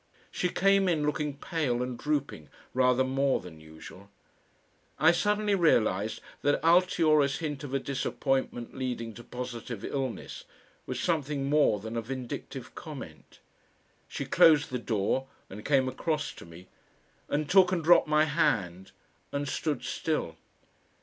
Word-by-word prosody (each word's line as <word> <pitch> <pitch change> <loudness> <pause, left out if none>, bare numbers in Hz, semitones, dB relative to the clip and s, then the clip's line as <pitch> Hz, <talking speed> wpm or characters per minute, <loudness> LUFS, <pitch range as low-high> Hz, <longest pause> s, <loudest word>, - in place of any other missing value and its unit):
She 180 - -1
came 195 +1 +3
in, 155 -4 +1
looking 150 -1 -2
pale 135 -7 -1
and 125 0 -4
drooping 140 - -3 0.2
rather 125 0 +3
more 135 +1 +1
than 85 -3 -11
usual. 80 +5 -13 0.9
I 160 +3 +6
suddenly 205 +4 +1
realised 110 - +2 0.2
that 145 0 +2
Altiora's 160 -5 +4
hint 150 -3 -4
of 140 -1 -4
a - - +4
disappointment 135 -2 -2
leading 120 -3 -4
to 120 - -11
positive 120 -3 -6
illness 135 -4 -4 0.4
was 130 -1 -3
something 145 -4 -1
more 145 -8 +3
than 110 +3 -7
a 115 - -1
vindictive 130 +1 -6
comment. 135 - -10 0.7
She - - -5
closed 155 -4 +5
the 125 - -2
door 115 +4 -1 0.2
and 105 +2 -8
came 135 -2 +2
across 150 +4 -2
to - - -12
me 85 +2 -13 0.6
and 150 0 -1
took 185 +1 +5
and 175 -3 0
dropped 175 0 +6
my 150 0 +4
hand 100 - 0 0.4
and 140 0 -2
stood 150 +1 -2
still. 150 - -2
135 Hz, 140 wpm, -29 LUFS, 120-155 Hz, 0.9 s, I